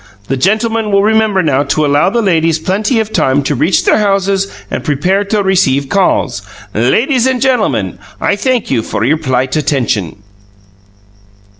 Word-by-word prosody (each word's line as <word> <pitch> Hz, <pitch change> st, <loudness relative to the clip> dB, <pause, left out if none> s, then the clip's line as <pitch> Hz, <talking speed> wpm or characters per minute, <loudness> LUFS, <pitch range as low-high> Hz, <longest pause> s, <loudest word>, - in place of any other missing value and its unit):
The 135 Hz, -, 0 dB
gentlemen 220 Hz, -, 0 dB
will 200 Hz, 0 st, +3 dB
remember 215 Hz, -3 st, +2 dB
now 140 Hz, -3 st, +1 dB
to 145 Hz, +2 st, 0 dB
allow 145 Hz, +5 st, +2 dB
the 235 Hz, +3 st, -1 dB
ladies 165 Hz, -4 st, +1 dB
plenty 205 Hz, +8 st, -1 dB
of 220 Hz, 0 st, -3 dB
time 135 Hz, +2 st, +1 dB
to 140 Hz, -, -1 dB
reach 155 Hz, +7 st, +1 dB
their -, -, +3 dB
houses 195 Hz, -1 st, 0 dB, 0.2 s
and -, -, -3 dB
prepare 180 Hz, +7 st, 0 dB
to 205 Hz, 0 st, 0 dB
receive 140 Hz, -8 st, +1 dB
calls. 195 Hz, -2 st, 0 dB, 0.3 s
Ladies 235 Hz, -, +1 dB
and 260 Hz, -1 st, 0 dB
gentlemen, 260 Hz, -1 st, 0 dB, 0.2 s
I 200 Hz, -, 0 dB
thank 245 Hz, -, -1 dB
you 120 Hz, -4 st, +1 dB
for 110 Hz, -, -3 dB
your 145 Hz, +7 st, +2 dB
polite 130 Hz, -3 st, -1 dB
attention." 120 Hz, -, -1 dB
190 Hz, 160 wpm, -13 LUFS, 140-215 Hz, 0.3 s, will